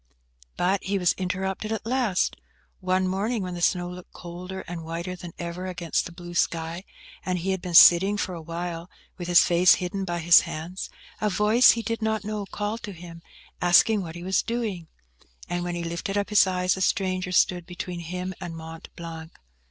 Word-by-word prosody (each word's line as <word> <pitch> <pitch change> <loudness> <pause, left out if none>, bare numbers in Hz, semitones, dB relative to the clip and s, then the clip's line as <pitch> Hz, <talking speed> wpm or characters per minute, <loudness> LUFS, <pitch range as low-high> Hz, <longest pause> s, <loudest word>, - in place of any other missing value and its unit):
But 190 +2 +1
he 200 +1 0
was 180 -2 +3
interrupted 190 +3 -3
at 220 -1 -3
last. 235 -6 +1 0.4
One 185 0 +1
morning, 200 +4 -1
when 180 -1 -4
the 175 - -6
snow 175 0 +2
looked 180 0 -10
colder 180 +2 -7
and 170 -1 -7
whiter 170 +3 -4
than 175 -1 -9
ever 175 +2 -5
against 175 -3 -1
the - - -11
blue 175 0 -10
sky, 170 +2 -1 0.4
and 185 -1 -1
he 185 +3 -1
had 190 -1 -2
been 175 -2 -4
sitting 190 +5 +8
for 190 -2 -2
a 170 - -6
while, 170 +1 -5 0.3
with 175 - -5
his 175 -1 +7
face 175 +1 +5
hidden 195 +2 -3
by 175 -2 -2
his 170 0 +7
hands, 170 +4 -6 0.3
a 210 - +2
voice 210 +5 +5
he 230 - -2
did 230 +1 -3
not 220 -1 0
know 210 -1 -4
called 210 +3 -4
to 205 - -7
him, 170 -1 -11 0.4
asking 180 +4 +5
what 165 -3 -7
he 175 - -8
was 190 +1 +2
doing. 220 -8 -3 0.6
And 175 0 -2
when 175 0 -3
he 170 - -3
lifted 170 +4 -3
up 200 - -1
his 210 -2 +6
eyes, 180 0 +1
a 190 - -5
stranger 185 -1 0
stood 180 -1 +2
between 180 -1 -6
him 180 +2 -5
and 165 -1 -6
Mont 160 0 -9
Blanc. 165 -1 -8
180 Hz, 200 wpm, -25 LUFS, 170-195 Hz, 0.6 s, sitting